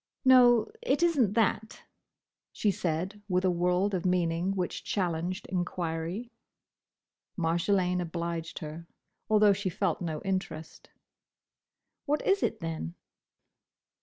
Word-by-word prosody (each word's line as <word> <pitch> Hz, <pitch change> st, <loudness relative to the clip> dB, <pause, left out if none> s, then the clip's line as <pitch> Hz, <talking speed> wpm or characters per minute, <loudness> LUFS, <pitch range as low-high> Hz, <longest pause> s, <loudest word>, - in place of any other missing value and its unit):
"No, 245 Hz, -3 st, +6 dB
it 345 Hz, -, +1 dB
is 340 Hz, -1 st, +3 dB
n't 210 Hz, -5 st, +3 dB
that," 220 Hz, -1 st, 0 dB, 0.7 s
she 210 Hz, -, +1 dB
said 185 Hz, +4 st, -3 dB
with 180 Hz, 0 st, +1 dB
a 185 Hz, -, +4 dB
world 180 Hz, +3 st, +1 dB
of 180 Hz, -, -1 dB
meaning 180 Hz, +1 st, +1 dB
which 180 Hz, -2 st, -3 dB
challenged 180 Hz, 0 st, -2 dB
enquiry. 175 Hz, +4 st, -3 dB, 1.1 s
Marjolaine 180 Hz, +2 st, +1 dB
obliged 170 Hz, -1 st, -4 dB
her, 160 Hz, +2 st, -8 dB, 0.4 s
although 210 Hz, -1 st, +5 dB
she 200 Hz, -1 st, -2 dB
felt 175 Hz, -, -1 dB
no 160 Hz, -3 st, -3 dB
interest. 185 Hz, -5 st, -4 dB, 1.2 s
"What 295 Hz, +1 st, +1 dB
is 395 Hz, +1 st, +3 dB
it, 220 Hz, -, -1 dB
then?" 160 Hz, -, -4 dB
180 Hz, 115 wpm, -29 LUFS, 170-210 Hz, 1.2 s, No